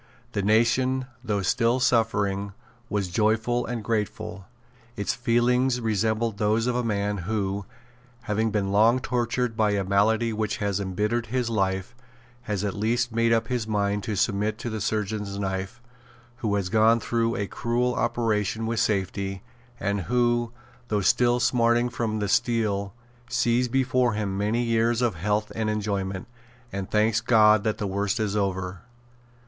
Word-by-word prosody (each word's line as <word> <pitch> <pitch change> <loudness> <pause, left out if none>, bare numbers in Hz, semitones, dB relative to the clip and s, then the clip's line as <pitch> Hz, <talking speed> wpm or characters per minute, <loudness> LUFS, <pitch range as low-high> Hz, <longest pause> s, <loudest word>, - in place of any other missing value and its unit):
The 100 - -1
nation, 120 +5 +2 0.2
though 100 -2 -1
still 120 +5 +2
suffering, 105 -5 +1 0.4
was 100 -2 -1
joyful 110 +5 +1
and 115 -2 -4
grateful. 105 -3 -3 0.5
Its 100 - -1
feelings 125 +1 +2
resembled 110 -1 0
those 110 +2 +2
of 125 -1 0
a 125 - 0
man 105 -2 -1
who, 100 -2 -1 0.6
having 110 -1 0
been 100 -2 -1
long 110 +4 +5
tortured 125 -1 -1
by 110 -2 +2
a 100 -1 0
malady 110 +4 +2
which 110 -1 -2
has 100 -2 -1
embittered 105 +5 -1
his 125 0 -1
life, 95 -1 -1 0.6
has 105 -2 -1
at 100 -2 -1
last 120 +3 0
made 115 +1 +2
up 115 0 +2
his 120 -3 -1
mind 105 -1 0
to 110 -3 -2
submit 105 +1 0
to 120 - -5
the 110 -1 -4
surgeon's 105 -1 -2
knife, 95 +3 -3 0.6
who 110 -5 -1
has 100 -3 -1
gone 110 +3 +4
through 115 +1 0
a 100 - -1
cruel 120 +4 -1
operation 115 -2 0
with 115 0 -1
safety, 95 -2 -1 0.4
and 100 0 -1
who, 120 +3 +1 0.4
though 105 -3 0
still 120 +5 +3
smarting 120 0 +2
from 115 -2 -2
the 105 -1 -1
steel, 100 -2 +1 0.4
sees 120 +1 +2
before 125 -1 +1
him 105 -2 -2
many 105 +4 0
years 115 0 +1
of 120 -3 +2
health 105 +5 -1
and 110 -1 -1
enjoyment, 100 -3 -2 0.5
and 95 -1 -4
thanks 110 +1 +2
God 110 -3 +5
that 110 -1 0
the 105 - -3
worst 100 +2 -1
is 105 -2 -1
over. 95 -2 -2
110 Hz, 155 wpm, -25 LUFS, 100-120 Hz, 0.6 s, long